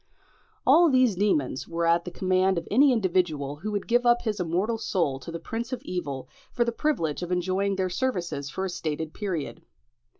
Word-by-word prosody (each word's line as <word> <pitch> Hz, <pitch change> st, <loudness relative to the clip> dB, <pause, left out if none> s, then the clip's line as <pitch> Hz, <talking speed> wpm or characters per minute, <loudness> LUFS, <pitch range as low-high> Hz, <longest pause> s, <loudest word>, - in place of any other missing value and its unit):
All 330 Hz, +5 st, +6 dB
these 255 Hz, -5 st, +4 dB
demons 165 Hz, -10 st, 0 dB
were 170 Hz, 0 st, -1 dB
at 170 Hz, +1 st, +3 dB
the -, -, -4 dB
command 185 Hz, +1 st, +1 dB
of 170 Hz, -, -3 dB
any 270 Hz, +6 st, +6 dB
individual 175 Hz, -, 0 dB
who 200 Hz, +8 st, -5 dB
would 205 Hz, -2 st, -2 dB
give 240 Hz, +1 st, +3 dB
up 240 Hz, 0 st, +3 dB
his 215 Hz, -3 st, -2 dB
immortal 185 Hz, +7 st, 0 dB
soul 165 Hz, -11 st, 0 dB
to 165 Hz, -, -8 dB
the 170 Hz, -, -4 dB
prince 230 Hz, +8 st, -5 dB
of 255 Hz, -, -4 dB
evil 145 Hz, -7 st, -4 dB, 0.2 s
for 240 Hz, -, +1 dB
the 235 Hz, -, 0 dB
privilege 230 Hz, -, -1 dB
of 175 Hz, 0 st, -4 dB
enjoying 190 Hz, +2 st, 0 dB
their 190 Hz, -1 st, 0 dB
services 175 Hz, -, -2 dB
for 190 Hz, -, -3 dB
a -, -, -2 dB
stated 155 Hz, -1 st, -4 dB
period. 185 Hz, -8 st, -4 dB
185 Hz, 195 wpm, -26 LUFS, 165-225 Hz, 0.2 s, All